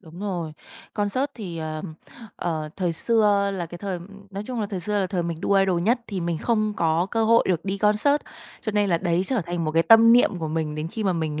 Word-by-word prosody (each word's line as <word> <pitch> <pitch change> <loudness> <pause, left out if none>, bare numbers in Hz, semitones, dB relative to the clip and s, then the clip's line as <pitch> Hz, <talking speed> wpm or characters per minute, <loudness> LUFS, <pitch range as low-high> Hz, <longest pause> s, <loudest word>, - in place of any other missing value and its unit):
Đúng 165 +3 -13
rồi. 175 -6 -3 0.4
Concert 210 +6 0
thì, 180 -7 -6
ờm, 155 +1 -5 0.4
ờ, 155 -3 -3
thời 180 -3 0
xưa 205 +1 +2
là 175 -2 -3
cái 175 +1 -10
thời 195 -3 -4 0.3
nói 200 +1 -5
chung 250 -3 -3
là 210 - -1
thời 195 -3 -5
xưa 205 +3 -1
là 190 - 0
thời 180 -2 -2
mình 170 -1 -4
đu - - 0
idol 195 -3 +3
nhất 235 +6 +2
thì 195 -4 -4
mình 170 -2 -2
không 215 -3 0
có 165 +2 +1
cơ 225 -1 +1
hội 230 +1 +5
được 175 -3 0
đi 195 0 -2
concert, 210 +8 +3 0.4
cho 215 - -3
nên 205 -1 +2
là 170 - +3
đấy 175 0 +1
trở 255 -5 +1
thành 175 -1 -2
một 155 - -1
cái 165 - +4
tâm 225 +4 +7
niệm 225 -6 +4
của 160 - -3
mình 155 -1 -2
đến 155 +1 -4
khi 220 +3 -4
mà 190 - +2
mình 155 -2 -2
185 Hz, 245 wpm, -24 LUFS, 165-210 Hz, 0.4 s, tâm